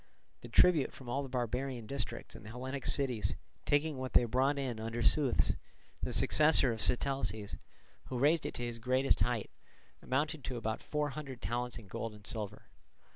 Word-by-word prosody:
The - - -10
tribute 170 -6 +5
from 130 -3 -10
all 135 +3 0
the 135 - -6
barbarian 125 0 -2
districts 140 +5 -4
and - - -10
the 105 - -9
Hellenic 130 +3 -4
cities, 125 -6 0 0.3
taking 145 -1 +1
what 130 0 -4
they - - +6
brought 130 +5 +2
in 130 -5 -2
under 115 +1 -3
Seuthes, 140 -2 +4 0.5
the - - -2
successor 150 -5 +5
of 110 - -6
Sitalces, 125 -5 0 0.5
who 130 - -4
raised 150 +5 +3
it - - -6
to 120 - -4
its 120 -1 -5
greatest 130 +3 +2
height, 120 -3 0 0.5
amounted 150 +3 -1
to 125 - -3
about 110 -1 -2
four 150 -1 -1
hundred 140 -3 -7
talents 120 +1 -2
in 105 - -11
gold 115 +2 -5
and 105 -1 -15
silver. 105 -3 -4
125 Hz, 180 wpm, -33 LUFS, 115-140 Hz, 0.5 s, they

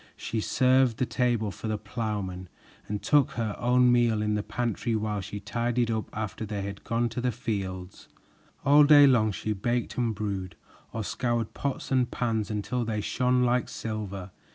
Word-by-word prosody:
She 110 -1 -3
served 130 0 +3
the 125 - +1
table 120 -5 0
for 110 - -7
the 110 -1 -1
plowmen 105 -5 -4 0.4
and 105 -1 -4
took 145 -3 +3
her 110 -3 -2
own 125 0 +4
meal 120 -3 +3
in 105 0 0
the 105 - 0
pantry 120 +1 -2
while 105 -1 -1
she 100 +2 -6
tidied 120 +3 -1
up 110 -1 -2
after 110 0 -4
they 105 -2 -4
had 100 0 -6
gone 115 +1 0
to 120 +2 -4
the 125 0 +1
fields. 95 -5 -5 0.6
All 145 +1 +7
day 145 -1 +8
long 115 -6 +4
she 105 +2 -2
baked 120 +5 -2
and 115 -3 0
brewed, 100 -3 -4 0.4
or 110 - -3
scoured 120 0 -1
pots 140 -1 -4
and 125 -2 +2
pans 110 -4 -1
until 105 +4 -2
they 110 -2 -2
shone 125 +4 +1
like 125 0 +1
silver. 100 -4 -5
110 Hz, 175 wpm, -27 LUFS, 105-125 Hz, 0.6 s, day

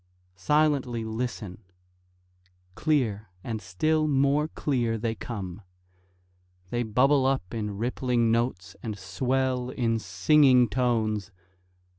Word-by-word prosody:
Silently 130 +1 +1
listen! 110 -4 -4 1.1
Clear, 110 - 0
and 110 -2 -4
still 155 - 0
more 140 +1 +2
clear, 120 -7 -1
they 110 +1 -1
come. 100 -4 -6 1.1
They 120 - 0
bubble 130 +4 +3
up 130 -9 -1
in 105 -3 -3
rippling 120 0 0
notes, 115 -5 -1
and 110 -3 -5
swell 125 +5 -1
in 115 -3 0
singing 125 - +4
tones. 110 -5 0
120 Hz, 100 wpm, -27 LUFS, 105-130 Hz, 1.1 s, singing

